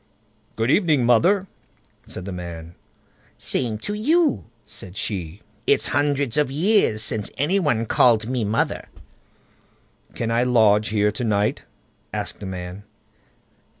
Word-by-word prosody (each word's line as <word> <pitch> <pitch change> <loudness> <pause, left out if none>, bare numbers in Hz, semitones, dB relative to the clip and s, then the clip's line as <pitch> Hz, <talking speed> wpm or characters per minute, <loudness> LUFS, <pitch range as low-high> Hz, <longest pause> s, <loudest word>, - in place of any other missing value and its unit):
"Good 115 +3 +1
evening, 155 - +3
mother!" 180 - +4 0.6
said 90 - -8
the 100 - -5
man. 85 -2 -7 0.6
"The - - -14
same 115 -4 -1
to 205 - -2
you", 230 - +2 0.2
said 95 +1 -11
she; 95 -4 -4 0.2
"it's - - +3
hundreds 145 -3 +1
of 150 -3 +2
years 155 - +2
since 110 -2 -2
any 165 +9 +1
one 120 -10 0
called 115 -1 +4
me 125 -2 -1
mother." 105 +2 -1 1.3
"Can 115 -1 -2
I 115 +1 +2
lodge 110 -4 +4
here 105 -1 +1
to 110 +4 -5
night?" 105 -2 0 0.5
asked - - -5
the 100 - -7
man. 90 +1 -6
115 Hz, 135 wpm, -22 LUFS, 100-145 Hz, 1.3 s, mother